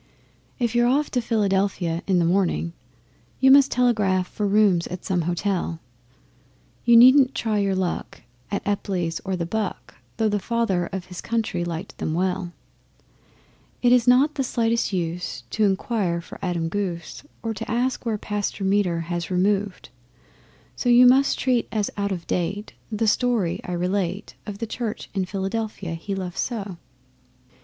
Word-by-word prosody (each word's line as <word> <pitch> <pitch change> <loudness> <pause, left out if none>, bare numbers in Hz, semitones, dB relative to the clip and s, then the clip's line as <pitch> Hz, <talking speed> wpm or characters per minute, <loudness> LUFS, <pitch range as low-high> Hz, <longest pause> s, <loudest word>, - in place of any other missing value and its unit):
If 235 -3 -1
you're 240 0 +3
off 285 +4 +1
to 250 - +1
Philadelphia 195 -6 0
in 190 -2 +3
the 170 - +3
morning, 175 -2 +1 0.7
You 265 0 +6
must 275 0 +7
telegraph 210 -7 +2
for 210 +1 -2
rooms 200 -4 +3
at 180 - -7
some 180 -2 0
Hotel. 175 -2 -1 1.1
You 235 -1 +7
needn't 260 +2 +7
try 215 -2 0
your 195 -1 +1
luck 185 -8 -3 0.3
at 200 -1 -3
Epply's 180 -5 -1
or 190 -1 -2
the 170 -2 -2
'Buck,' 210 +2 -4 0.2
Though 220 -1 +2
the 205 -1 0
Father 200 -6 0
of 190 -2 -5
his 180 -1 -8
Country 220 -6 -1
liked 175 +2 -6
them 155 - -2
well. 180 0 -1 1.3
It 245 - +5
is 250 -1 +4
not 265 +5 +5
the 275 - -1
slightest 230 -3 0
use 170 -6 -3
to 215 - +2
inquire 195 -3 0
for 170 - -11
Adam 175 -3 -1
Goos, 175 -2 -4 0.2
Or 225 -1 -2
to - - -7
ask 245 +3 0
where 225 -3 -1
Pastor 205 -1 -3
Meder 190 -4 +1
has 170 0 -4
removed 195 0 0 0.9
so 245 - -1
You 245 +1 +7
must 265 +3 +5
treat 250 -3 +1
as 210 -2 -1
out 200 0 -1
of 175 -3 -4
date 195 +4 -2 0.2
the 220 +1 0
story 215 -5 +1
I 180 - -5
relate 185 +2 -2
Of 205 -1 -5
the 230 - -3
Church 225 0 -5
in 190 -2 -1
Philadelphia 195 -1 -3
he 180 +4 -4
loved 185 -2 -5
so. 205 -7 -3
200 Hz, 160 wpm, -24 LUFS, 180-230 Hz, 1.3 s, must